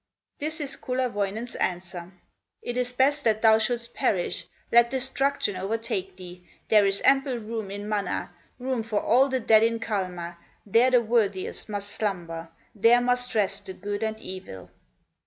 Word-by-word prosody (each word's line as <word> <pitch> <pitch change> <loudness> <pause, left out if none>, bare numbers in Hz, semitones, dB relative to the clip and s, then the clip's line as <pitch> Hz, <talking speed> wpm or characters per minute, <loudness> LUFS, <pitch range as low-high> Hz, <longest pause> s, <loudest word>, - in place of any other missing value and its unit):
This 310 +2 -3
is 285 -2 -5
Kullerwoinen's 235 -3 -2
answer: 175 -1 -3 0.5
"It 240 - -4
is 250 0 0
best 280 +4 +2
that 220 -1 +1
thou 220 -1 +7
shouldst 235 +1 -1
perish, 195 -10 -1 0.2
Let 235 0 +6
destruction 265 -3 0
overtake 195 -1 -3
thee, 180 -1 -11 0.3
There 210 -2 +6
is 195 0 -1
ample 270 -2 +3
room 220 -2 -5
in 205 +1 -6
Mana, 205 -4 -2 0.2
Room 255 -1 -2
for 220 -2 -1
all 260 +4 +4
the 260 -1 0
dead 220 -2 +5
in 230 0 +2
Kalma, 180 -6 -3 0.3
There 230 +5 +4
the 250 -2 +5
worthiest 215 -4 0
must 205 -1 -4
slumber, 170 -6 -3 0.2
There 230 +3 +5
must 245 0 0
rest 200 -2 0
the 190 - -5
good 205 +1 -4
and 220 0 -2
evil." 185 - -9
220 Hz, 155 wpm, -26 LUFS, 195-245 Hz, 0.5 s, thou